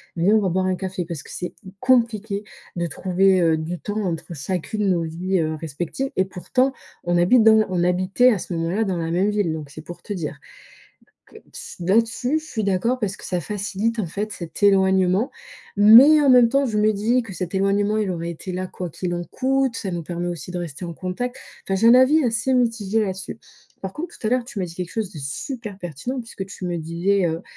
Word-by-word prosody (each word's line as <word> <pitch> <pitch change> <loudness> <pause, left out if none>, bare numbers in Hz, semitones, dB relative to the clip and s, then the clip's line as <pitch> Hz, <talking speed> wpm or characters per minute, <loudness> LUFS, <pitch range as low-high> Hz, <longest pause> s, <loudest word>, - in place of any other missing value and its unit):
viens, 180 +5 +3
on 215 - +4
va 190 - +1
boire 185 +2 0
un 185 0 +1
café». 185 -2 -4
Parce 165 -4 -5
que - - -16
c'est 180 - -5 0.3
compliqué 225 -5 +1 0.3
de 170 -1 -1
trouver, 185 +3 +2
heu, 160 -1 +3
du 165 +2 -4
temps 210 +1 -3
entre 170 -1 -4
chacune, 190 +6 -2
nos 170 -2 +1
vies, 175 +3 -1
heu, 155 -1 0
respectives. 170 - -4
Et 190 - +2
pourtant, 255 +9 0 0.3
on 175 0 +1
habite 220 +7 +5
dans 220 -1 +6
on 180 -2 0
habitait 185 +7 +3
à 210 - 0
ce 175 - -6
moment-là 170 +7 0
dans 185 -3 -1
la 165 0 -2
même 185 +4 +2
ville, 205 -6 0
donc 150 -3 -6
c'est 155 +2 -10
pour 175 +1 -10
te 205 - -5
dire. 155 -5 -5 0.9
Que - - -17 0.2
si - - -9
là-dessus, 230 - +2
je - - -14
suis 220 -8 -3
d'accord 200 +6 +1
parce 205 -4 -2
que - - -14
ça 180 -1 -2
facilite, 210 +4 -2
en 195 - 0
fait, 205 +6 -4
cet 170 +3 -8
éloignement. 190 +2 +3 0.5
Mais 250 +9 +9
en 280 - +3
même 250 -2 +7
temps, 275 0 +2
je 215 -3 -2
me 215 +1 +3
dis 230 +5 +1
que 210 -4 -9
cet 180 +1 -5
éloignement, 200 +2 +1
il 210 -3 0
aurait 170 -1 -3
été 170 +3 -7
là 185 +1 -3
quoi 180 -2 -6
qu'il 175 +3 -3
en 175 0 -3
coûte. 265 +4 0
Ça 195 - -4
nous 170 -1 -3
permet 175 +2 -4
aussi 175 0 -6
de 180 - -4
rester 170 -1 -6
en 170 - -5
contact. 195 +9 -4 0.3
Enfin, 195 - -1
j'ai 225 - +2
un 240 - +8
avis 280 +5 +5
assez 230 +2 0
mitigé 225 -3 +1
là-dessus. 190 +1 -4 0.4
Par 190 -1 -5
contre, 335 - -7
tout 215 - -4
à - - +1
l'heure, 250 -1 +1
tu 235 - -8
m'as 190 - 0
dit 170 -2 -9
quelque 180 0 -5
chose 215 -4 -3
de 155 - -9
super 205 - -6
pertinent, 180 - -5
puisque 225 -4 -7
tu 190 -2 -7
me 175 -1 -2
disais, 170 +4 0
heu, 165 +1 -2
190 Hz, 230 wpm, -22 LUFS, 175-225 Hz, 0.9 s, Mais